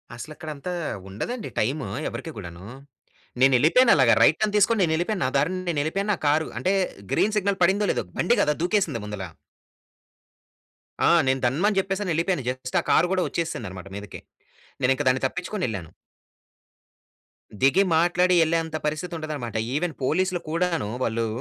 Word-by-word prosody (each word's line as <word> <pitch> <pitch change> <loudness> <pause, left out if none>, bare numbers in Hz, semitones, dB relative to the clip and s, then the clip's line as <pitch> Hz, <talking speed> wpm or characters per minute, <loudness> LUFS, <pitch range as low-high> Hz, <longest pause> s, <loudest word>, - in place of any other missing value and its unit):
అసలు 155 +6 -8
అక్కడ 160 0 -8
అంతా 145 +6 -6 0.4
ఉండదండి, 220 - -5
టైము 135 +7 -1 0.2
ఎవరికీ 165 - -7
కూడాను. 90 -2 -9 0.8
నేను 135 0 +6
వెళ్ళిపోయాను 230 - +5
అలాగా 130 -5 +5
రైట్ 155 - +4
టర్న్ 210 -1 +1
తీసుకొని, 215 +2 +3
నేను 160 -2 +1
వెళ్ళిపోయాను. 175 +3 -1
నా - - +1
దారిన 160 +7 0
నేను 160 -4 0
వెళ్ళిపోయాను. 195 +7 -1
నా - - -2
కారు 155 +2 +2
అంటే 185 - +1 0.4
గ్రీన్ 215 +1 +2
సిగ్నల్ 200 -1 0
పడిందో, 200 +4 +3
లేదో, - - -2 0.2
బండి 240 - +3
కదా! 150 - +2
దూకేసింది 180 - 0
ముందలా. 100 -3 -6 1.8
ఆ! - - +5 0.2
నేను 130 0 +2
ధన్మని 185 - +1
చెప్పేసి 195 +1 -2
అని 185 - -2
వెళ్ళిపోయాను. 165 -2 0
జస్ట్ 130 0 -3
ఆ - - -17
కారు 170 - +4
కూడా 185 -1 +1
వచ్చేసింది 165 - -3
అన్నమాట 95 +1 -9
మీదకి. 100 0 -9 0.6
నేను 125 0 +3
ఇంక - - -2
దాన్ని 130 +1 0
తప్పించుకొని 180 +6 -5
వెళ్ళాను. 95 -8 -5 1.7
దిగి 140 +9 +5
మాట్లాడి 180 +2 +3
వెళ్ళే 165 +1 +2
అంతా 160 -1 -4
పరిస్థితి 155 +4 -3
ఉండదన్నమాట. 150 -8 -5 0.2
ఈవెన్ 165 +2 -1
పోలీస్‌లు 180 +6 +1
కూడాను, 165 - -1
వాళ్ళు 115 0 -1
160 Hz, 165 wpm, -24 LUFS, 130-185 Hz, 1.8 s, నేను